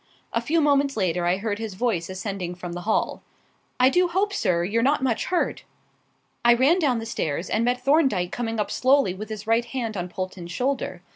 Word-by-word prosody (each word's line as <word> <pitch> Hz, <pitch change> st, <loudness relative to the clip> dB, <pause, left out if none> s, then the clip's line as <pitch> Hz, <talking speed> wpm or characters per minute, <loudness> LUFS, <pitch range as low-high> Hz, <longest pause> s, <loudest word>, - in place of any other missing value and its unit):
A 230 Hz, -, +1 dB
few 320 Hz, +7 st, +1 dB
moments 280 Hz, -2 st, +2 dB
later 175 Hz, -3 st, 0 dB
I 180 Hz, +2 st, +2 dB
heard 205 Hz, +1 st, -3 dB
his 220 Hz, -4 st, -5 dB
voice 195 Hz, -6 st, -1 dB
ascending 185 Hz, -2 st, -4 dB
from 175 Hz, -1 st, -7 dB
the 175 Hz, -, -5 dB
hall -, -, 0 dB, 0.6 s
"I 255 Hz, +1 st, +6 dB
do 360 Hz, +3 st, +3 dB
hope, 390 Hz, +4 st, 0 dB
sir, 170 Hz, -, +1 dB
you're 210 Hz, +6 st, 0 dB
not 275 Hz, +2 st, +2 dB
much 240 Hz, -4 st, 0 dB
hurt?" 360 Hz, -, -1 dB, 0.8 s
I 240 Hz, 0 st, +6 dB
ran 280 Hz, +9 st, +4 dB
down 275 Hz, -8 st, +2 dB
the 225 Hz, -, -4 dB
stairs 170 Hz, -6 st, -3 dB
and 225 Hz, -, +1 dB
met 245 Hz, +1 st, 0 dB
Thorndyke 270 Hz, -, +3 dB
coming 225 Hz, -2 st, -3 dB
up 210 Hz, -, -1 dB
slowly 260 Hz, -7 st, +3 dB
with 215 Hz, +4 st, -8 dB
his 215 Hz, -1 st, -6 dB
right 230 Hz, +2 st, +2 dB
hand 235 Hz, -3 st, -4 dB
on 180 Hz, -1 st, -3 dB
Polton's 185 Hz, -1 st, -6 dB
shoulder. 260 Hz, +8 st, -2 dB
225 Hz, 205 wpm, -24 LUFS, 185-265 Hz, 0.8 s, I